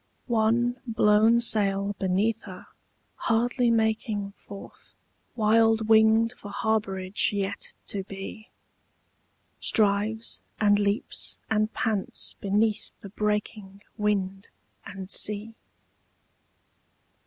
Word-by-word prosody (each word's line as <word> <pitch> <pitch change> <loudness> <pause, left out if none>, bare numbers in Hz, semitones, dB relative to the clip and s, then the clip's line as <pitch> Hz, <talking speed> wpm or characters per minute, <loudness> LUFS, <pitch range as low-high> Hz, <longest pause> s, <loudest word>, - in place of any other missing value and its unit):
One 235 +1 +1
blown 220 +1 +4
sail 200 -3 +3
beneath 200 +4 0
her, 185 -3 -10 0.5
hardly 240 +2 +1
making 220 -2 0 0.2
Forth, 200 -1 -12 0.4
wild 225 0 +3
winged 220 +1 +5
for 205 - -11
harbourage 200 -3 -1
yet 200 -1 -4
to 195 -2 -4
be, 195 +3 -9 1.1
Strives 215 +2 +1 0.2
and 205 -1 +4
leaps 205 +6 0
and 215 0 +1
pants 215 -4 0
beneath 210 +2 0
the 200 - -9
breaking 210 -1 -3
Wind 195 -2 -2 0.4
and 195 -1 -8
sea. 210 +2 +1
210 Hz, 90 wpm, -26 LUFS, 200-225 Hz, 1.1 s, winged